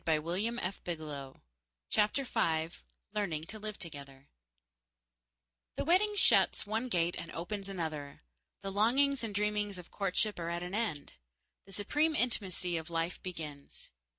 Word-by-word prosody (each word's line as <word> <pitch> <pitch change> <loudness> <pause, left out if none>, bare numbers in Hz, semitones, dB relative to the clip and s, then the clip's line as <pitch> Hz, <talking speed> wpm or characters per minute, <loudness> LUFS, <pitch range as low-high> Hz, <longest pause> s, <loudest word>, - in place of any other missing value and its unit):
Gladys 155 -2 +2
Hoagland 185 -2 -1
Groves 140 -4 -7 0.5
CHAPTER 215 +6 +3
FIVE 165 -8 0 0.3
Learning 175 -8 -1
to 215 +6 -6
Live 215 0 -5
Together 140 -4 -9 1.5
The - - -1
wedding 395 +6 +4
shuts - - +6
one 220 +4 -1
gate 175 -3 +2
and 170 - -6
opens 195 +3 -4
another. 155 - -4 0.4
The 195 - -3
longings 255 +6 +3
and 215 -3 -3
dreamings 210 -1 +1
of 180 -1 -10
courtship 200 +1 +1
are 170 0 -2
at 170 +1 -2
an 180 +1 -5
end. 205 -10 -2 0.5
The - - -13
supreme 295 - +2
intimacy 185 - +1
of 160 +1 -5
life 165 +1 -1
begins. 155 -6 -7
185 Hz, 140 wpm, -33 LUFS, 165-215 Hz, 1.5 s, shuts